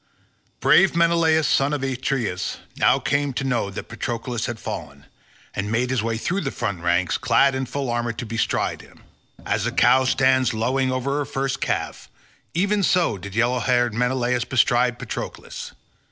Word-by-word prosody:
Brave 195 Hz, -3 st, +5 dB
Menelaus 165 Hz, -2 st, +3 dB
son 140 Hz, +2 st, +2 dB
of 145 Hz, -2 st, -2 dB
Atreus 130 Hz, -2 st, -2 dB, 0.2 s
now -, -, +4 dB
came 145 Hz, -1 st, 0 dB
to 140 Hz, -, -2 dB
know 125 Hz, -6 st, 0 dB
that 100 Hz, -, -7 dB
Patroclus 120 Hz, -1 st, -3 dB
had 120 Hz, -, -4 dB
fallen, 70 Hz, 0 st, -7 dB, 0.5 s
and 100 Hz, +2 st, -3 dB
made 125 Hz, +3 st, 0 dB
his 130 Hz, -4 st, +1 dB
way 115 Hz, 0 st, -1 dB
through 180 Hz, -, -1 dB
the 135 Hz, -, -2 dB
front 95 Hz, -9 st, -3 dB
ranks 85 Hz, +1 st, +1 dB
clad 140 Hz, 0 st, +3 dB
in 130 Hz, 0 st, -2 dB
full 140 Hz, +1 st, -3 dB
armour 120 Hz, 0 st, -1 dB
to 115 Hz, +2 st, -6 dB
bestride 115 Hz, 0 st, -1 dB
him. -, -, -19 dB, 0.4 s
As -, -, 0 dB
a -, -, -1 dB
cow 130 Hz, 0 st, +4 dB
stands 130 Hz, -2 st, +2 dB
lowing 130 Hz, +4 st, 0 dB
over 135 Hz, +3 st, -1 dB
her 145 Hz, -, -1 dB
first 135 Hz, 0 st, -3 dB
calf, -, -, -3 dB, 0.5 s
even 200 Hz, +4 st, +1 dB
so 180 Hz, -, +2 dB
did 100 Hz, +1 st, -8 dB
yellow 120 Hz, +2 st, +2 dB
haired 120 Hz, -2 st, +1 dB
Menelaus 125 Hz, +1 st, 0 dB
bestride 125 Hz, -1 st, +2 dB
Patroclus. -, -, -6 dB
125 Hz, 170 wpm, -23 LUFS, 115-135 Hz, 0.5 s, Brave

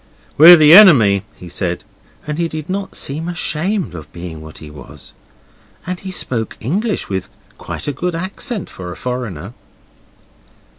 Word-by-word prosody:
'We're 170 Hz, +4 st, +10 dB
the 155 Hz, -1 st, +6 dB
enemy,' 130 Hz, -, +7 dB
he 90 Hz, -, -12 dB
said, 90 Hz, 0 st, -4 dB, 0.4 s
and 150 Hz, +1 st, -4 dB
he 170 Hz, -, 0 dB
did 155 Hz, -2 st, -7 dB
not 195 Hz, 0 st, -4 dB
seem 155 Hz, +5 st, -3 dB
ashamed 175 Hz, -, -2 dB
of 80 Hz, -3 st, -10 dB
being 85 Hz, -2 st, -9 dB
what 80 Hz, 0 st, -12 dB
he 75 Hz, -1 st, -11 dB
was. 75 Hz, -, -13 dB, 0.7 s
And 180 Hz, 0 st, -4 dB
he 195 Hz, -, -8 dB
spoke 120 Hz, -11 st, -3 dB
English 200 Hz, -, -2 dB
with 95 Hz, -2 st, -4 dB, 0.3 s
quite -, -, -5 dB
a -, -, 0 dB
good 175 Hz, +5 st, -3 dB
accent 190 Hz, +4 st, -4 dB
for 90 Hz, -1 st, -9 dB
a -, -, -8 dB
foreigner. 115 Hz, -7 st, -5 dB
150 Hz, 155 wpm, -17 LUFS, -, 0.7 s, We're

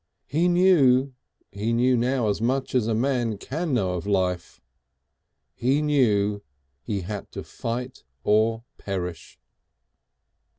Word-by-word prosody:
He 165 Hz, +5 st, +1 dB
knew 145 Hz, -8 st, +4 dB, 0.4 s
he 110 Hz, +3 st, -2 dB
knew 125 Hz, +2 st, +3 dB
now 125 Hz, 0 st, +1 dB
as 105 Hz, 0 st, -1 dB
much 130 Hz, +3 st, -1 dB
as 125 Hz, -4 st, +2 dB
a 115 Hz, -, +1 dB
man 120 Hz, -3 st, 0 dB
can 160 Hz, -, -4 dB
know 95 Hz, -6 st, +1 dB
of 90 Hz, +2 st, -4 dB
life. 95 Hz, -3 st, -1 dB, 0.9 s
He 130 Hz, +4 st, +1 dB
knew 105 Hz, -9 st, +2 dB, 0.4 s
he 105 Hz, -4 st, -3 dB
had 100 Hz, +2 st, -6 dB
to -, -, -6 dB
fight 125 Hz, +2 st, -5 dB, 0.2 s
or 110 Hz, +2 st, +2 dB, 0.2 s
perish. 90 Hz, -4 st, -5 dB
115 Hz, 125 wpm, -25 LUFS, 100-130 Hz, 0.9 s, knew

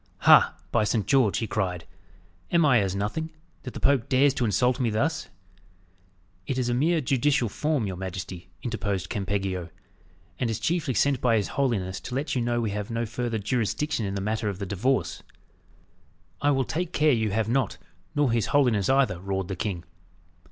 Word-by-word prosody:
"Ha! -, -, +6 dB, 0.2 s
by 115 Hz, -, +3 dB
Saint 105 Hz, 0 st, 0 dB
George!" 130 Hz, -7 st, +3 dB
he 115 Hz, -, -1 dB
cried; 90 Hz, -6 st, -2 dB, 0.7 s
"am 170 Hz, -2 st, +4 dB
I 130 Hz, -5 st, +5 dB
as 95 Hz, -2 st, -1 dB
nothing, 110 Hz, +11 st, -2 dB, 0.3 s
that 125 Hz, -, -8 dB
the -, -, -4 dB
Pope 135 Hz, -4 st, +2 dB
dares 135 Hz, +1 st, +4 dB
to 125 Hz, -, 0 dB
insult 125 Hz, +4 st, +2 dB
me 125 Hz, -3 st, +1 dB
thus?" 145 Hz, +9 st, -1 dB, 1.2 s
"It 130 Hz, -, -1 dB
is 125 Hz, -1 st, 0 dB
a -, -, +1 dB
mere 160 Hz, +6 st, +2 dB
judicial 135 Hz, -2 st, +1 dB
form 150 Hz, +1 st, -1 dB
your 95 Hz, -2 st, -4 dB
majesty," 90 Hz, -1 st, -6 dB
interposed 100 Hz, -5 st, -2 dB
Campeggio, 95 Hz, -4 st, -2 dB, 0.7 s
"and 120 Hz, -, 0 dB
is 110 Hz, -1 st, -2 dB
chiefly 155 Hz, 0 st, 0 dB
sent 140 Hz, -3 st, +2 dB
by 115 Hz, -3 st, +3 dB
his 105 Hz, -, -1 dB
holiness 105 Hz, -9 st, -1 dB
to 125 Hz, -, -6 dB
let 145 Hz, +2 st, -2 dB
you 125 Hz, -, 0 dB
know 120 Hz, 0 st, 0 dB
we 110 Hz, -3 st, -1 dB
have 105 Hz, 0 st, -4 dB
no 115 Hz, 0 st, -1 dB
further 120 Hz, 0 st, -3 dB
jurisdiction 115 Hz, +3 st, -1 dB
in 95 Hz, -, -3 dB
the 100 Hz, -, -2 dB
matter 110 Hz, +1 st, -1 dB
of 100 Hz, -, -4 dB
the 100 Hz, -, -4 dB
divorce." 105 Hz, +8 st, -1 dB, 1.2 s
"I 145 Hz, -, +3 dB
will 135 Hz, -2 st, +2 dB
take 175 Hz, +2 st, -3 dB
care 150 Hz, 0 st, +4 dB
you 110 Hz, -4 st, +1 dB
have 110 Hz, +1 st, 0 dB
not, 125 Hz, -1 st, 0 dB, 0.4 s
nor 145 Hz, -4 st, +2 dB
his 115 Hz, -3 st, +1 dB
holiness 125 Hz, -8 st, +2 dB
either," 130 Hz, -10 st, +3 dB
roared 95 Hz, 0 st, -3 dB
the 95 Hz, -, -2 dB
king. 90 Hz, -2 st, -3 dB
115 Hz, 185 wpm, -26 LUFS, 100-135 Hz, 1.2 s, Ha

